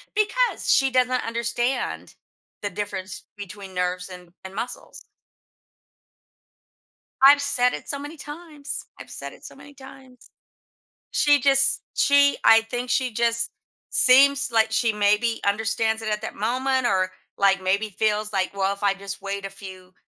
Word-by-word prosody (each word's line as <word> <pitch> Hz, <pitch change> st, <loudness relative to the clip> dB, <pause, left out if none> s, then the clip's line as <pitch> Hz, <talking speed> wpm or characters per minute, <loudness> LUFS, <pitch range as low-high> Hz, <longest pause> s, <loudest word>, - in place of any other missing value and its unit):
because 435 Hz, +4 st, +1 dB
she 270 Hz, -1 st, +3 dB
doesn't 255 Hz, 0 st, +1 dB
understand 235 Hz, +2 st, -2 dB, 0.5 s
the 205 Hz, -, -2 dB
difference 190 Hz, -1 st, -6 dB
between 195 Hz, -1 st, -9 dB
nerves 180 Hz, 0 st, -2 dB
and 180 Hz, -1 st, -12 dB, 0.2 s
and 190 Hz, +1 st, -9 dB
muscles. 240 Hz, +3 st, -6 dB, 2.2 s
I've 285 Hz, +1 st, +8 dB
said 250 Hz, -3 st, +1 dB
it -, -, -8 dB
so 280 Hz, -, -3 dB
many 295 Hz, +3 st, -8 dB
times. 295 Hz, 0 st, -8 dB
I've -, -, -11 dB
said -, -, -8 dB
it -, -, -16 dB
so -, -, -11 dB
many 285 Hz, -, -15 dB
times. 265 Hz, -2 st, -15 dB, 0.8 s
She 290 Hz, -1 st, +3 dB
just 275 Hz, +1 st, +3 dB
she 280 Hz, 0 st, +4 dB
I 225 Hz, 0 st, +7 dB
think 245 Hz, +2 st, -5 dB
she 255 Hz, -3 st, +1 dB
just 235 Hz, +1 st, 0 dB, 0.4 s
seems 275 Hz, 0 st, +5 dB
like 220 Hz, -1 st, +3 dB
she 220 Hz, 0 st, +1 dB
maybe 210 Hz, +3 st, +1 dB
understands 220 Hz, +2 st, 0 dB
it 215 Hz, -1 st, -2 dB
at 210 Hz, -, -2 dB
that -, -, -6 dB
moment 260 Hz, +3 st, 0 dB
or, 185 Hz, -3 st, +1 dB, 0.3 s
like, 195 Hz, -1 st, +3 dB
maybe 200 Hz, +3 st, 0 dB
feels 215 Hz, +1 st, -1 dB
like, 190 Hz, -1 st, 0 dB
"Well, 195 Hz, 0 st, 0 dB
if 200 Hz, -, -15 dB
I 200 Hz, -1 st, +3 dB
just 195 Hz, 0 st, -8 dB
wait 195 Hz, 0 st, -4 dB
a -, -, -8 dB
few 185 Hz, -2 st, -12 dB
225 Hz, 150 wpm, -23 LUFS, 200-265 Hz, 2.2 s, I've